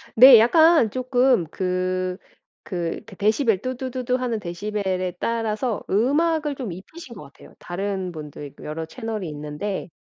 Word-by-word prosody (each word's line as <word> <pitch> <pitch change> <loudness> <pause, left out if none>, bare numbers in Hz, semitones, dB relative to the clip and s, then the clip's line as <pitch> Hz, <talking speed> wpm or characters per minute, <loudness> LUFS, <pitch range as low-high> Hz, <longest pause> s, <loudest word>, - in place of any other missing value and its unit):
네. 255 +1 +10
약간 315 -1 +5
쪼끔 255 -6 +2
그 185 0 -2 0.5
그 175 -3 -3
데 200 - -13
데시벨 215 0 +2
"뚜두두두."하는 255 -2 -2
데시벨에 185 -1 -3
따라서 225 0 -1
음악을 295 - +1
좀 245 -9 -5
입히신 235 - -10
것 170 - -10
같아요, 140 - -16
다른 190 0 -3
분도 150 -3 -9
있고 140 - -13
여러 160 +2 -5
채널이 215 0 -5
있는데 150 +7 -5
210 Hz, 295 characters per minute, -23 LUFS, 180-255 Hz, 0.5 s, 네